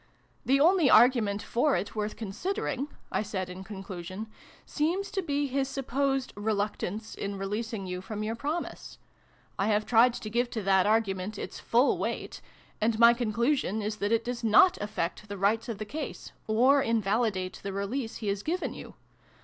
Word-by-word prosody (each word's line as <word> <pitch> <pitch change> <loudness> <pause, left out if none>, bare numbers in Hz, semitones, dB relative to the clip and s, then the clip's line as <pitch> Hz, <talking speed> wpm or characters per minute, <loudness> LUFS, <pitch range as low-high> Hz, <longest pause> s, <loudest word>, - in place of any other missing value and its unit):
" - - -38
The 270 +2 +4
only 335 -1 +5
argument 220 -4 +5
for 270 +5 +2
it, 205 - -3
worth 210 0 -2
consider 355 - -3
ing," 270 +2 -2 0.2
I - - +1
said 190 -3 -4
in 185 +1 -8
conclusion, 190 0 -7 0.2
" - - -24
seems 345 +6 0
to 390 - -1
be 290 -4 -1
his 270 0 -1
supposed 270 0 -1
reluctance 210 0 -2
in 200 0 -4
releasing 210 +1 -3
you 180 0 -4
from 210 +2 -5
your 220 +1 -2
promise. 300 +8 -4 0.6
I 195 - +2
have 210 0 +2
tried 235 +1 +5
to 215 - -6
give 240 +2 +1
to 220 -3 -4
that 190 0 +4
argument 205 -2 0
its - - -6
full 245 +4 +2
weight, - - -4 0.4
and 220 +1 +2
my 235 +1 +8
conclusion 235 -1 0
is 210 +1 -3
that 205 +1 -1
it 230 0 +2
does 245 0 -4
not 225 - +6
affect 205 0 -3
the 200 - -5
rights 215 +5 +1
of 225 - -3
the 215 - -5
case, 305 +9 -6 0.2
or 255 +6 +4
invalidate 215 -4 0
the 200 - -4
release 220 +5 -3
he 215 - -5
has 200 0 -1
given 350 - -2
you. - - -10
220 Hz, 180 wpm, -29 LUFS, 200-255 Hz, 0.6 s, my